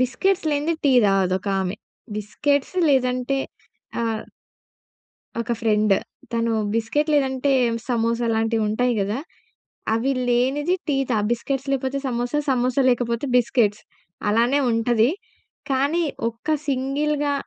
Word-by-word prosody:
Biscuits 330 +8 +1
లేనిదే 295 +3 0
tea 270 - +5
తాగదు 195 -2 +2
ఒక 200 - -6
ఆమె 190 +2 -2 0.4
బిస్కెట్స్ 280 - -1
లేదంటే 255 0 +1 0.6
ఆ - - 0 1.4
ఒక 235 0 -2
ఫ్రెండ్. 215 -3 +3 0.4
తను 230 0 +1 0.2
బిస్కిట్ 260 +8 0
లేదంటే 270 -1 +1 0.4
సమోసా 235 0 +1
లాంటివి 225 0 +1
ఉంటాయి 245 +3 +1
కదా. 205 +4 -1 0.8
అవి 245 +5 +1 0.2
లేనిది 275 +8 +2
టీ 280 - +2
తాగ్ 210 -1 +1
బిస్కిట్స్ 270 +3 -2
లేకపోతే 270 0 -1
సమోసా, 245 +4 -1
సమోసా 255 +1 +2
లేకపోతే 240 +1 0
బిస్కిట్స్ 235 -4 +2 0.5
అలానే 235 +6 +3
ఉంటది. 230 +1 +2 0.6
కానీ 285 +6 +1 0.3
ఒక్క 230 +6 -9 0.2
సింగిల్‌గా 285 +2 0
245 Hz, 115 wpm, -23 LUFS, 230-275 Hz, 1.4 s, టీ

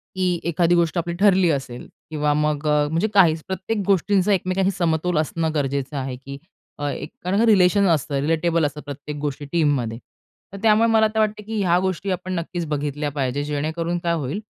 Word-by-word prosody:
की 180 -2 0
एखादी 170 +1 +2
गोष्ट 170 0 +1
आपली 170 0 -1
ठरली 190 -3 +4
असेल 135 -4 -4 0.2
किंवा 150 -1 0
मग 150 0 0
अ, 150 0 +2
म्हणजे 165 +7 0
काहीच 165 -5 +4
प्रत्येक 190 +4 -3
गोष्टींचा 200 +1 +2
एकमेकांशी 190 +1 0
समतोल 170 -2 0
असणं 160 +1 -1
गरजेचं 140 0 -2
आहे 130 -1 -3
की 140 +2 -9 0.4
अ, 145 0 -1
एक 150 +5 -8
रिलेशन 200 -1 +4
असतं 145 -3 0
रिलेटेबल 165 +3 +1
असतं 145 +1 -4
प्रत्येक 145 +1 -7
गोष्टी 145 0 -4
टीममध्ये. 145 -9 +1 0.6
तर - - -6
त्यामुळे 225 +1 +5
मला 220 -1 +4
आता 220 0 -1
वाटतं 215 -1 0
की 220 0 -4
ह्या 175 -2 +3
गोष्टी 190 +1 -2
आपण 185 +1 -3
नक्कीच 170 0 -4
बघितल्या 150 0 -2
पाहिजेत 140 0 -2
जेणेकरून 160 +4 -2
काय 170 -1 +1
होईल 160 +4 -3
165 Hz, 175 wpm, -22 LUFS, 145-185 Hz, 0.6 s, त्यामुळे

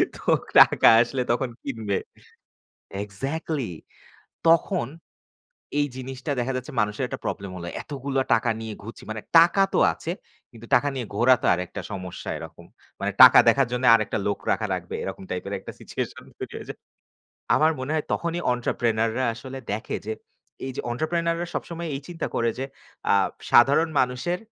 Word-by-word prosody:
তো - - -12 0.4
টাকা - - +7
আসলে 125 +2 -1
তখন 125 +2 0
কিনবে। 110 -7 -2 1.1
Exactly, 135 - -4 0.8
তখন 170 +3 +3 0.9
এই 145 - +2
জিনিসটা 130 +2 -6
দেখা 125 +2 -1
যাচ্ছে 130 +4 -6
মানুষের 105 +4 -1
একটা - - -6
problem 100 -2 -4
হলো। 85 -1 -6 0.2
এতগুলো 140 -1 -4 0.2
টাকা 120 - +1
নিয়ে 110 -1 -5
ঘুরছি। 115 +3 -10
মানে 110 0 -4 0.2
টাকা 170 +4 +6
তো - - +3
আছে 165 - -6 0.4
কিন্তু 115 -1 -13
টাকা 145 +4 +4
নিয়ে 125 -3 -4
ঘোরা 120 +5 +5
তো - - 0
আরেকটা 90 +1 -5
সমস্যা 90 -2 -7
এরকম। - - -11 0.3
মানে - - -1
টাকা - - +10
দেখার 135 -3 +4
জন্য 125 +1 -1
আরেকটা 110 -1 +1
লোক 100 - 0
রাখা 110 - +1
লাগবে 90 -1 -6
এরকম 95 0 -6
type 90 - -4
এর - - -6
একটা - - -9
situation - - -5 0.2
তৈরি - - -7
হয়ে - - -8
যায়। - - -7 0.8
আমার 155 +1 +4
মনে 130 +2 -4
হয় 155 - 0
তখনই 170 0 -1
entrepreneur 115 -2 0
রা 130 - +1
আসলে 130 +3 -8
দেখে 105 +2 -3
যে 110 - -2 0.5
এই 135 - -4
যে - - -1
entrepreneur 165 +6 0
রা 175 - -2
সবসময় 170 0 -4
এই - - -6
চিন্তা 175 -2 -4
করে 115 0 +1
যে 135 - -2 0.5
আ - - +5 0.4
সাধারণ 140 +7 +6
মানুষের 125 +8 -1
130 Hz, 165 wpm, -25 LUFS, 110-150 Hz, 1.1 s, টাকা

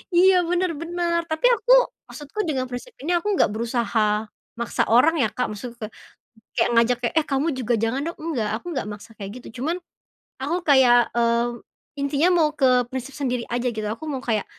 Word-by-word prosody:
Iya, 370 +1 +6
benar 355 0 +1
benar. 340 0 -1
Tapi 315 +9 -1
aku 485 +4 -1 0.4
maksudku 295 +8 -9
dengan 260 -3 -1
prinsip 250 - -7
ini 330 +5 -2
aku 345 - -4
nggak - - +4
berusaha 235 0 -1 0.6
maksa 235 - 0
orang 315 +8 +5
ya, 225 - +3
Kak, 250 - 0
maksudku 235 +3 -8
ka - - -6 0.7
kayak - - +3
ngajak 235 +1 +4
kayak, 235 - 0
"Eh, 310 - -6
kamu 275 +3 +1
juga 240 -1 0
jangan 240 +5 0
dong." 335 - -4
Enggak, 285 -10 -2
aku 295 - -11
nggak 260 -7 -3
maksa 210 +2 -11
kayak 200 -1 -7
gitu. - - -12
Cuman, 330 +5 0 0.7
aku 300 +6 -1
kayak, 245 -3 +6
mmm, 235 0 +2 0.5
intinya 280 +4 +2
mau 310 -2 +4
ke 270 - +4 0.3
prinsip 260 +1 -5
sendiri 250 -4 -2
aja 245 +1 0
gitu, 215 -1 -3
aku 315 +7 -9
mau 265 -2 -4
kayak 215 -3 0
260 Hz, 190 wpm, -23 LUFS, 235-325 Hz, 0.7 s, Iya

